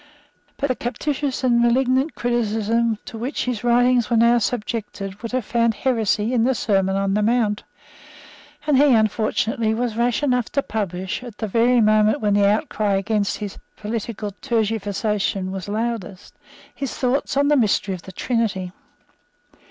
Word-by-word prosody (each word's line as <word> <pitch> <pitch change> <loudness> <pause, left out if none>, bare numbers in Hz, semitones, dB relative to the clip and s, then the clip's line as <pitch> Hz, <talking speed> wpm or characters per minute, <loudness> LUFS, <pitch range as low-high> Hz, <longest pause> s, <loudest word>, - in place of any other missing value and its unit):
But 280 - -1
the 255 - +1
captious 265 +4 -3
and 240 -2 +3
malignant 260 +4 +2
criticism 230 -1 0
to 225 - -8
which 255 +6 -3
his 245 -3 -3
writings 245 0 +3
were 235 - +2
now 235 +1 +5
subjected 210 -3 -4
would 230 - -5
have 255 -3 -1
found 230 -1 +1
heresy 225 -1 0
in 235 -3 +2
the 260 +2 +2
Sermon 195 -4 +1
on 195 0 0
the 210 - +1
Mount; 220 -2 +1 1.0
and 295 -3 +3
he, 285 -1 +5
unfortunately, 220 +1 +1
was 235 -1 -2
rash 240 +4 0
enough 250 -4 +1
to 280 - +1
publish, 190 -2 -3
at 240 -4 -10
the 220 - -3
very 235 +3 +3
moment 215 0 +3
when 210 -2 +1
the 200 0 +4
outcry 210 -1 0
against 200 +1 0
his 205 -2 -6 0.2
political 215 -1 -4
tergiversation 210 -4 -1
was 190 0 -6
loudest, 215 -3 -4 0.4
his 275 -2 -5
thoughts 270 +2 0
on 285 +1 +3
the 295 - +4
mystery 210 -5 +1
of 180 - -7
the 190 - -11
Trinity. 200 -4 -1
225 Hz, 160 wpm, -22 LUFS, 210-245 Hz, 1.0 s, now